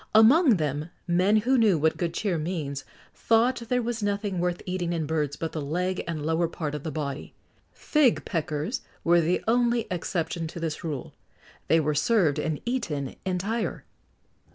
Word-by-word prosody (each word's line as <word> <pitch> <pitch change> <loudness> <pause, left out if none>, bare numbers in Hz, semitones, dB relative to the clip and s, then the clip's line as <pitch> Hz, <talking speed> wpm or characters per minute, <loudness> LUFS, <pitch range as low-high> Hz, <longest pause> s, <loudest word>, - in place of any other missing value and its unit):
[XX - - -23
75] 220 0 +9
Among 295 - +5
them, 150 0 -2 0.2
men 180 +4 +3
who 250 +4 +3
knew 210 -6 +4
what 155 +1 +2
good 170 -2 -1
cheer 190 -6 0
means, 150 -4 -3 0.3
thought 230 +3 +2
there 250 -1 +1
was 235 -1 -3
nothing 200 -2 -1
worth 175 0 -1
eating 180 -2 -2
in 165 -2 -1
birds 150 -2 -1
but 165 +3 -4
the 155 - -4
leg 180 +6 -1
and 155 -3 -3
lower 160 +2 +1
part 155 -3 -4
of 150 - -4
the 160 - -4
body. 145 -2 -5 0.4
Fig 295 -6 +2
peckers 160 - -2 0.2
were 170 0 +5
the 170 +3 0
only 235 0 +2
exception 170 -2 -2
to 170 - -8
this 165 -2 -3
rule: 150 -6 -4 0.5
they 165 - +4
were 150 -1 +1
served 155 0 +2
and 155 -2 -1
eaten 165 - -2
entire. 195 +5 -2
175 Hz, 175 wpm, -26 LUFS, 155-215 Hz, 0.5 s, 75